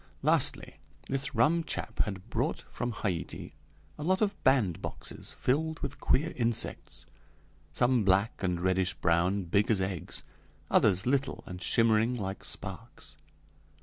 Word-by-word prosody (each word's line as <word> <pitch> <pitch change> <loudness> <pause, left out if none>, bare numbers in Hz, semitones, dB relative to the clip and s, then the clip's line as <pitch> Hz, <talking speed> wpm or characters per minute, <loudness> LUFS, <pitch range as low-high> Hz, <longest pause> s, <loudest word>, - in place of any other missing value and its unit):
Lastly, - - +2 0.3
this 135 0 -2
rum 160 +9 +3
chap - - -4
had 95 -1 -6
brought - - 0
from 120 0 -4
Haiti 95 -6 -4 0.5
a - - -4
lot 185 +4 +2
of 205 -2 +1
bandboxes 120 -11 0
filled 160 +5 0
with 140 - -5
queer 160 +5 +1
insects 115 -2 -2 0.7
some 120 +7 +3
black 95 +3 +2
and 90 -3 0
reddish 95 +1 +1
brown, 90 +4 +2
big 100 +4 +1
as 110 -4 +3
eggs; 95 -2 -3 0.5
others 95 -1 +4
little 140 +2 0
and 90 0 -8
shimmering 115 +3 +3
like 95 -4 -4
sparks. - - -7
110 Hz, 130 wpm, -30 LUFS, 95-130 Hz, 0.7 s, others